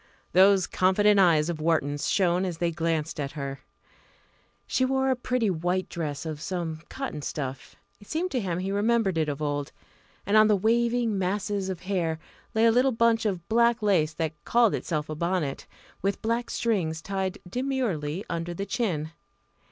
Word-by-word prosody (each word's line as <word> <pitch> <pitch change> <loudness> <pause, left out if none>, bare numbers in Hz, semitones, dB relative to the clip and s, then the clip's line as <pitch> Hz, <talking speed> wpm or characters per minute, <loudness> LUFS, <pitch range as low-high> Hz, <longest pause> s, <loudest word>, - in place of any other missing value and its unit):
Those 190 0 +5
confident 200 +2 +3
eyes 165 -5 +4
of 165 -3 -3
Wharton's 145 -3 0
shone 180 -2 +2
as 180 -3 -3
they 170 0 0
glanced 160 -1 -2
at 140 -1 -3
her. 140 -2 -5 1.1
She 260 - 0
wore 265 0 +2
a - - +2
pretty 250 -4 0
white 180 +2 -1
dress 155 -4 -4
of 155 -2 -5
some 170 -3 -3
cotton 265 - -5
stuff 135 -2 -5 0.2
it 205 - -17
seemed 355 +4 -2
to 255 - 0
him 180 -6 -2
he 190 +2 -2
remembered 205 -1 +2
it 160 -2 +1
of 145 +1 -3
old 145 -1 -2 0.5
and 200 - +1
on 215 0 +7
the 210 - +4
waving 230 +1 +1
masses 195 +1 -1
of 185 -2 -4
hair 180 -4 -1 0.4
lay 220 +1 +4
a 230 - +6
little 250 +3 +3
bunch 230 -1 +2
of 180 -4 -3
black 235 0 +3
lace 165 -7 +2
that 160 -1 -2
called 235 -3 +3
itself 155 -3 -2
a 155 - -4
bonnet, 170 -3 -2 0.3
with 195 +1 -1
black 230 +2 -1
strings 170 -8 -1
tied 190 -1 -2
demurely 205 - -2
under 170 0 -3
the 195 - -3
chin. 175 -8 -2
185 Hz, 175 wpm, -27 LUFS, 160-220 Hz, 1.1 s, on